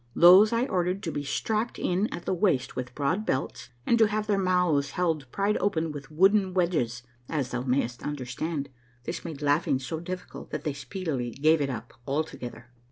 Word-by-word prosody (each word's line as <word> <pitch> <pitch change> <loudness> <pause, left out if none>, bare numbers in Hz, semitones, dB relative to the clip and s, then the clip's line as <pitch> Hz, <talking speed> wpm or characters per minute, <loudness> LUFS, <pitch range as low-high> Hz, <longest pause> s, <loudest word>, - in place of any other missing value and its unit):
These 185 +5 +8
I 235 +2 +2
ordered 185 -3 -1
to 165 - -2
be 145 - -3
strapped 215 - -1
in 190 +5 0
at 175 - -6
the - - 0
waist 180 -8 +1
with 125 -1 -5
broad 160 +9 0
belts, 125 - -2 0.2
and 235 - +3
to 220 - +6
have 210 0 -1
their 205 -2 +1
mouths 180 -6 +2
held 160 -7 0
pried 200 +1 +1
open 165 -5 0
with 145 -2 -8
wooden 190 +4 +3
wedges. 150 -10 0 0.3
As 140 -6 -2
thou 125 - -2
mayst 125 -2 -1
understand, 145 +2 -3 0.3
this - - -5
made 155 -3 -6
laughing 145 -1 +2
so 135 +5 -4
difficult 180 +2 -7
that - - -4
they 150 -3 -1
speedily 145 -5 -3
gave 155 +5 +3
it 140 - 0
up 125 -1 -6
altogether. 125 -5 -4
160 Hz, 185 wpm, -27 LUFS, 135-185 Hz, 0.3 s, These